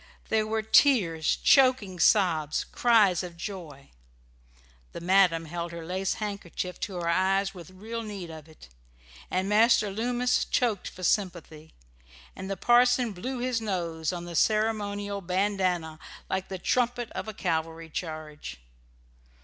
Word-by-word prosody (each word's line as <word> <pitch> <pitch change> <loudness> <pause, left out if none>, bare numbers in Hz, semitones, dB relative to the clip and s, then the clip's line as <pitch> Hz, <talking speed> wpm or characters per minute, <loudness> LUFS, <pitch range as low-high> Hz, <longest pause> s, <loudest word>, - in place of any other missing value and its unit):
There 215 -1 +1
were 220 0 -1
tears, 205 - +3
choking 255 -9 +4
sobs, 165 -6 +3
cries 215 -7 +4
of 175 -2 -8
joy. 165 -7 -8 1.0
The - - -6
madam 175 -2 +3
held 170 +1 -5
her 170 -1 -7
lace 185 +2 -2
handkerchief 200 -4 -5
to 195 - -4
her 175 -1 -3
eyes 190 +3 +1
with 180 -1 -11
real 220 +5 -6
need 200 -6 -7
of 160 -1 -11
it; 155 - -16 0.6
Master 210 +3 +3
Loomis 245 +4 0
choked 230 -6 0
for 185 - -10
sympathy; 170 -5 -2 0.6
and 190 - -7
the 195 - -3
parson 245 +2 +4
blew 250 +8 -5
his 245 -1 -1
nose 170 -6 -2
on 175 -1 -6
the 170 -1 -7
ceremonial 205 0 0
bandanna 180 -4 -1 0.3
like 190 0 -1
the 190 - -5
trumpet 245 +4 0
of - - -5
a 220 - -5
cavalry 165 -1 -2
charge. 155 - -6
190 Hz, 135 wpm, -27 LUFS, 170-215 Hz, 1.0 s, choking